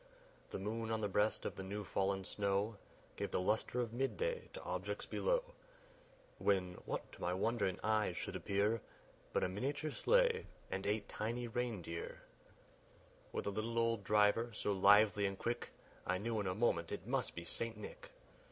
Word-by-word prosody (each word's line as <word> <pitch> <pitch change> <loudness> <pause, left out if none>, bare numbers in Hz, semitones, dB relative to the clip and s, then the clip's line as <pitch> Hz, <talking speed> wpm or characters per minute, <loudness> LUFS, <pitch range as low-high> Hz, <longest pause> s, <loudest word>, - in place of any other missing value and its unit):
The - - -3
moon 110 +3 -2
on 110 -1 0
the 105 - +1
breast 105 +2 +1
of - - -2
the 95 - -5
new 100 +2 -3
fallen 95 0 0
snow 100 +2 0 0.4
Gave - - -1
the - - 0
lustre 110 +6 +1
of 115 -2 -3
mid 135 +3 0
day 475 0 -1
to - - -7
objects - - -3
below, - - +1 1.0
When, 95 -3 +2
what - - -3
to - - -13
my 90 +1 +1
wondering 100 -2 +1
eyes 110 0 +2
should - - -3
appear, 100 +3 +1 0.5
But - - +1
a - - +3
miniature 140 +11 -2
sleigh, 485 - +3 0.2
and 95 +1 -2
eight 105 +1 0
tiny 120 +3 -2
reindeer, 110 -8 -3 1.1
With - - -2
a 100 - 0
little 110 +3 -2
old 115 -2 +2
driver, 105 +3 +4
so 105 - 0
lively 100 +1 +6
and 95 0 -4
quick, 120 +3 -2 0.4
I 95 - +2
knew 110 +3 -1
in 100 - -1
a 90 - 0
moment 85 -7 +2
it 100 -2 -4
must 130 +1 0
be 85 - -5
St. 115 +4 0
Nick. 105 - -8
105 Hz, 175 wpm, -38 LUFS, 100-115 Hz, 1.1 s, lively